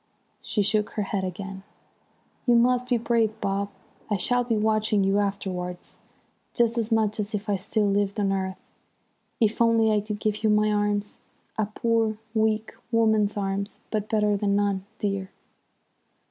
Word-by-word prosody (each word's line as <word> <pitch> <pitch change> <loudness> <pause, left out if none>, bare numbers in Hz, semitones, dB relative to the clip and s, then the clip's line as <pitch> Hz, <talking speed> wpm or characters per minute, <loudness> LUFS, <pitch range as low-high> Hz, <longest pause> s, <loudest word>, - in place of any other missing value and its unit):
"She 210 - 0
shook 210 +1 +1
her 210 - -1
head 195 -1 -2
again. 190 +1 -5 0.9
"'You 240 - +6
must 250 +1 +3
be 245 - +3
brave, 225 -2 +1
Bob. 200 0 -1 0.4
I 205 - +1
shall 245 +6 +1
be 235 -2 0
watching 215 -1 +2
you 195 +1 +2
afterwards 185 -3 -3 0.6
just 235 -1 +2
as 230 0 -2
much 220 -1 +2
as 210 +1 -2
if 210 +2 -4
I 205 - +2
still 210 +3 0
lived 200 +1 0
on 200 -1 +1
earth. 190 -1 -2 0.8
If 220 0 +1
only 230 -1 +4
I 210 -1 +2
could 210 0 -5
give 215 0 -1
you 220 - +4
my 210 0 +3
arms! 205 0 -1 0.4
A 215 -2 0
poor, 225 0 0 0.2
weak 220 0 +1 0.2
woman's 220 -3 +3
arms, 200 +1 -3
but 215 -1 -2
better 210 -1 +2
than 200 0 +1
none, 200 -1 0
dear.' 195 -2 -2
210 Hz, 160 wpm, -26 LUFS, 200-220 Hz, 0.9 s, You